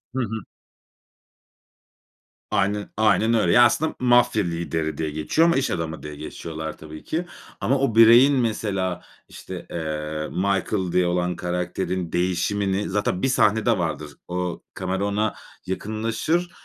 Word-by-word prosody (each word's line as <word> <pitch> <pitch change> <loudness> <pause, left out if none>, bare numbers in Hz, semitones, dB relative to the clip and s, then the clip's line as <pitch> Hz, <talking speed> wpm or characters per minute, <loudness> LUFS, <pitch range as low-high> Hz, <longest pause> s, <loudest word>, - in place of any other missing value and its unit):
Hı - - 0
hı. 110 0 -4 2.1
Aynen 100 +1 0
aynen 110 +1 +3
öyle. 115 - +3
Ya, 120 - +7
aslında 155 +7 +2
m 125 - -3
mafya 120 -3 +4
lideri 85 -2 -2
diye 80 -1 -2
geçiyor 80 - +2
ama 170 - +3
iş 135 - 0
adamı 80 -2 -4
diye 75 -1 -7
geçiriyorlar 80 +1 -6
tabii 80 0 -10
ki. 170 +3 -2 0.4
Ama 135 - +2
o 135 -5 0
bireyin 120 +5 +8
mesela, 105 -7 -1 0.3
işte, - - -9
eee, 75 -1 -4
Michael 95 0 0
diye 90 0 +2
olan 90 0 0
karakterin 90 0 -3
değişimini 95 +3 0
zaten 95 -2 -1
bir - - +2
sahnede 110 -2 +3
vardır, 80 -4 -3 0.2
o 90 -1 -3
kamera 95 +1 -2
ona 105 +1 0 0.3
yakınlaşır 115 - -2
95 Hz, 135 wpm, -23 LUFS, 85-110 Hz, 2.1 s, bireyin